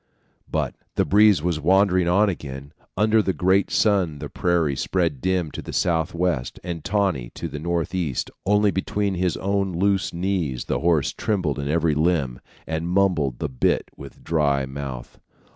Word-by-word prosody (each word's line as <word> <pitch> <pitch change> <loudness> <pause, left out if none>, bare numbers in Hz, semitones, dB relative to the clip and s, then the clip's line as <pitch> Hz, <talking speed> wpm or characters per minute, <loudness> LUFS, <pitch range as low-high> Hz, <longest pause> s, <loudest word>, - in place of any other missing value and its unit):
But - - -1 0.2
the - - +2
breeze 105 -5 +5
was 85 -3 0
wandering 95 +2 +3
on 100 +5 +4
again; 70 -5 -6 0.2
under 110 +2 +4
the 95 -2 -1
great 95 +3 +2
sun 95 -8 +2
the 70 0 -7
prairie 85 -5 +1
spread 85 -4 -1
dim 90 -4 0
to - - -6
the - - -8
southwest, 85 -4 0
and 85 -3 -5
tawny 95 - 0
to 85 - -4
the 75 -2 -6
northeast; 85 -3 -2
only 105 +1 +3
between 100 +1 -1
his 90 -1 0
own 100 -1 -1
loose 95 +2 +1
knees 85 -8 -2
the - - -1
horse 80 -2 +2
trembled 90 -10 -1
in 70 - -3
every 80 +1 +2
limb, 75 -5 0 0.2
and 80 +1 -3
mumbled 90 -9 +1
the - - -2
bit 65 -3 0
with - - -12
dry 70 -4 +1
mouth. 65 -2 -7
85 Hz, 160 wpm, -23 LUFS, 75-95 Hz, 0.2 s, breeze